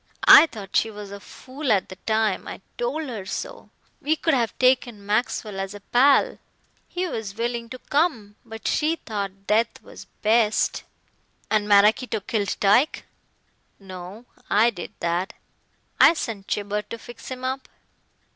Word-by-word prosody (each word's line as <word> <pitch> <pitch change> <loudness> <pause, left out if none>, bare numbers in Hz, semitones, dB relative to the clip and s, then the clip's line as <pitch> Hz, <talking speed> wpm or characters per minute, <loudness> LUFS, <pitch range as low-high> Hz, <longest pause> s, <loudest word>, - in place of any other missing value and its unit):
I 330 - +10
thought 205 -8 -10
she 225 - +3
was 205 -2 -9
a 200 - -8
fool 260 +5 -5
at 195 -3 +2
the 190 - -8
time. 220 -3 0
I - - -8
told 485 -10 -2
her 225 -6 -5
so. 190 - -6 0.3
We 310 +2 +1
could 320 0 0
have 235 -4 0
taken 250 -5 +1
Maxwell 210 -1 -1
as 195 +1 -4
a - - -8
pal. 265 +7 +3 0.5
He 360 +1 -3
was 220 - -5
willing 235 0 -3
to 255 - -7
come. 255 -8 -1
But 225 -1 -8
she 315 +2 +1
thought 200 - -6
death 220 +3 +1
was - - -12 0.2
best." 220 0 +2 0.7
"And 215 -1 +2
Maraquito 210 +3 +4
killed 205 -1 -2
Tyke?" 240 +9 +3 0.7
"No. 190 +3 -10 0.2
I 225 +3 +4
did 175 -6 -8
that. 175 +4 -1 0.7
I 335 - +7
sent 210 -9 -5
Gibber 205 0 -2
to 210 +3 -8
fix 240 +1 -12
him 255 -1 -7
up. 260 +1 -3
220 Hz, 155 wpm, -24 LUFS, 200-255 Hz, 0.7 s, I